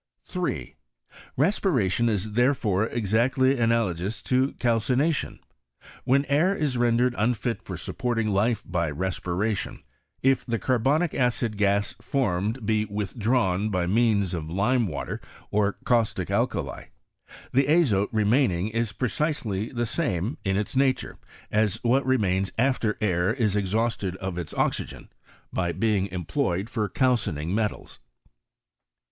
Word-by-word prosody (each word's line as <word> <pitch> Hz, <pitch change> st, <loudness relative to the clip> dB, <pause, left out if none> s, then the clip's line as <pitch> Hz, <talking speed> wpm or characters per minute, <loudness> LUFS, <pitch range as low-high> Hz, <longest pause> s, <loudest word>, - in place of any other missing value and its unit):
3. -, -, -3 dB, 0.6 s
Respiration 130 Hz, -, +2 dB
is 105 Hz, 0 st, -1 dB
therefore 115 Hz, -4 st, +2 dB
exactly 120 Hz, +5 st, +1 dB
analogous 110 Hz, -4 st, 0 dB
to 130 Hz, +2 st, +1 dB
calcination. 125 Hz, +6 st, 0 dB, 0.7 s
When 140 Hz, +3 st, +3 dB
air 155 Hz, +8 st, +2 dB
is 150 Hz, -8 st, -1 dB
rendered 120 Hz, +1 st, +2 dB
unfit 115 Hz, 0 st, 0 dB
for -, -, -7 dB
sup -, -, -7 dB
porting 115 Hz, -3 st, 0 dB
life 105 Hz, +4 st, +1 dB
by 85 Hz, -3 st, -1 dB
respiration, 95 Hz, +4 st, -2 dB, 0.4 s
if 135 Hz, 0 st, +3 dB
the 115 Hz, -2 st, -1 dB
carbonic 135 Hz, +8 st, +1 dB
acid 125 Hz, -3 st, 0 dB
gas 100 Hz, 0 st, +1 dB
formed 115 Hz, -2 st, -1 dB
be 110 Hz, 0 st, +1 dB
withdrawn 105 Hz, 0 st, 0 dB
by 90 Hz, -3 st, 0 dB
means 100 Hz, -1 st, +2 dB
of 80 Hz, -2 st, -4 dB
lime 110 Hz, +7 st, +1 dB
water, 75 Hz, -5 st, -5 dB, 0.3 s
or 100 Hz, -1 st, +2 dB
caustic 115 Hz, -3 st, +1 dB
alkali, -, -, -1 dB, 0.7 s
the 135 Hz, +1 st, +3 dB
azote 135 Hz, -, +3 dB
remaining 110 Hz, -3 st, +2 dB
is 115 Hz, -1 st, -1 dB
precisely 120 Hz, -, -2 dB
the 120 Hz, -1 st, -1 dB
same, 110 Hz, -, -1 dB
in 95 Hz, -2 st, 0 dB
its 105 Hz, +3 st, -3 dB
nature, 130 Hz, -1 st, +1 dB, 0.3 s
as 105 Hz, -2 st, +2 dB
what 130 Hz, +3 st, +3 dB
remains 100 Hz, -7 st, +1 dB
after 120 Hz, -3 st, +1 dB
air 90 Hz, -1 st, +1 dB
is 115 Hz, -5 st, 0 dB
ex 100 Hz, -3 st, -1 dB
yhausted 110 Hz, -4 st, 0 dB
of 95 Hz, -2 st, -4 dB
its 85 Hz, -, -5 dB
oxygen -, -, -2 dB, 0.4 s
by 85 Hz, -2 st, 0 dB
being 100 Hz, +1 st, +1 dB
employed 95 Hz, -, -2 dB
for 105 Hz, -4 st, -1 dB
cal 130 Hz, -2 st, +3 dB
fioing 85 Hz, -9 st, -3 dB
metals. 105 Hz, +2 st, -2 dB
110 Hz, 130 wpm, -26 LUFS, 95-125 Hz, 0.7 s, When